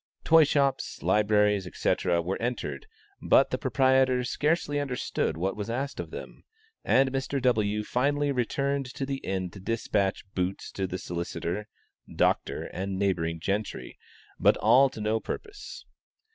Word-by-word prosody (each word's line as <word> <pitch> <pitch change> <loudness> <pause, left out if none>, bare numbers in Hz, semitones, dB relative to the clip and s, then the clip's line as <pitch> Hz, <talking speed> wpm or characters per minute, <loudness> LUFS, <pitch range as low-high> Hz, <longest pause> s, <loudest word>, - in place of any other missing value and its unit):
Toyshops, 145 -4 +3
libraries, 105 -2 +3
etc., 85 0 0
were 95 +3 -3
entered, 125 - -3 0.3
but - - +4
the - - -1
proprietors 130 -2 +2
scarcely 150 -1 0
understood 125 - -2
what 95 +4 -1
was 105 +1 -5
asked 135 +4 -3
of - - -5
them, - - -9 0.4
and 130 +1 +3
Mr. 135 +1 -2
W. 105 -4 +1
finally 145 +5 +1
returned 140 +2 -1
to 135 - -2
the 135 0 -3
inn 95 -7 -3
to 95 - -11
dispatch 100 -2 -1
"Boots" 90 +1 -3
to 95 -1 -3
the 90 - -4
solicitor, 85 +3 -4 0.5
doctor, - - +1
and 95 +1 -4
neighboring 85 -4 0
gentry 100 +5 -3 0.4
but - - +4
all 135 +2 +5
to 130 - -10
no 110 +1 0
purpose. 415 - -7
110 Hz, 140 wpm, -27 LUFS, 95-135 Hz, 0.5 s, all